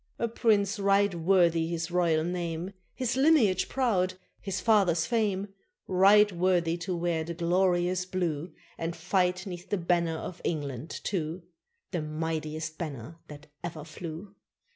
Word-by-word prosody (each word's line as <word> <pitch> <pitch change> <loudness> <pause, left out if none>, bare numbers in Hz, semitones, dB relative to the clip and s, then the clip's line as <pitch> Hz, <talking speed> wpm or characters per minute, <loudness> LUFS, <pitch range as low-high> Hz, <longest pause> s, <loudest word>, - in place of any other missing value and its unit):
A 235 - 0
prince 215 -2 +1
right 200 0 +3
worthy 170 -1 +3
his 170 0 -3
royal 170 -3 +2
name, 175 +1 -3 0.2
His 250 -2 -1
lineage 265 - +4
proud, 190 -9 +1 0.2
his 195 -2 -3
father's 185 -7 +3
fame; 205 -3 0 0.4
Right 200 +3 +5
worthy 175 -2 +1
to 175 +1 -3
wear 170 -2 0
the 170 +1 -6
glorious 180 +1 +1
blue, 175 -3 -2 0.3
And 165 +1 -3
fight 180 +1 0
'neath 180 -2 -8
the 205 - +1
banner 170 -2 +1
of 180 +2 -7
England 145 -3 -3
too 170 -2 -3 0.5
The 175 - -1
mightiest 155 0 -4
banner 155 0 -6
that 150 0 -11 0.2
ever 165 -3 -5
flew! 170 +4 -8
175 Hz, 140 wpm, -28 LUFS, 165-195 Hz, 0.5 s, Right